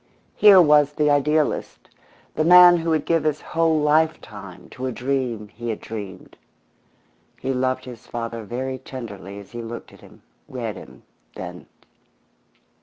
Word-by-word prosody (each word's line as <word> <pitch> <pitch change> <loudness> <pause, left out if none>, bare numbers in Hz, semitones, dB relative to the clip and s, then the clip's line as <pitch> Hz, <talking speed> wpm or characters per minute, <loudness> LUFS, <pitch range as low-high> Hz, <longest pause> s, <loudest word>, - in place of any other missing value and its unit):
Here 205 -3 +7
was 150 -3 +5
the 150 0 +2
idealist, 150 +1 0 0.5
the 155 - 0
man 175 +1 +8
who 165 0 -3
would 155 -2 0
give 165 -1 +1
his 155 -1 0
whole 165 -1 +1
lifetime 150 - -1
to 130 +1 -6
a - - -2
dream 125 -4 -3
he 120 +2 -7
had 110 - -3
dreamed. 100 -4 -9 1.0
He 135 - -2
loved 130 0 -1
his 125 -3 -11
father 115 -1 -5
very 130 +4 -5
tenderly 105 -7 -9
as 100 -1 -12
he 120 -1 -6
looked 115 +1 -8
at - - -17
him, - - -18 0.2
read 115 -4 -5
him, - - -13 0.3
then. 90 0 -8
130 Hz, 150 wpm, -22 LUFS, 115-150 Hz, 1.0 s, man